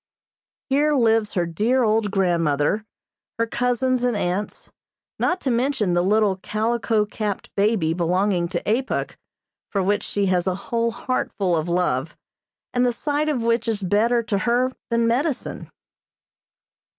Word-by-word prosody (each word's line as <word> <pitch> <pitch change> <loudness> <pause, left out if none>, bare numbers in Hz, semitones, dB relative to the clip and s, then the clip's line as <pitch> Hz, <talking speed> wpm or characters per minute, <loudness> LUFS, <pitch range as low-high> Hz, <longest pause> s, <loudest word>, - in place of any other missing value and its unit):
Here 295 +2 +2
lives 225 -4 +2
her 175 -2 +1
dear, 220 +10 +1
old 215 -1 +2
grandmother, 175 -1 +1 0.5
her 230 - +1
cousins 250 +2 0
and 245 -3 +1
aunts, 190 +3 -3 0.5
not 360 - +1
to 265 - 0
mention 235 -6 +1
the 175 - +3
little 205 0 +2
calico 220 +2 0
capped 210 -1 -4
baby 200 -6 +2
belonging 180 +1 +1
to - - -3
Apuk, 245 +5 0 0.6
for 195 -2 0
which 205 +2 +1
she 200 -1 -1
has 180 -2 +1
a 185 - +1
whole 230 +4 -1
heartful 205 -6 -1
of 160 +1 -1
love, 165 -5 0 0.6
and 245 - +2
the 250 - +3
sight 295 +5 -1
of 255 -6 -1
which 230 0 +1
is 215 -3 -1
better 230 +5 +2
to 210 -3 -1
her 245 +4 +1 0.2
than 235 -1 +2
medicine. 260 +5 -1
215 Hz, 145 wpm, -23 LUFS, 185-240 Hz, 0.6 s, the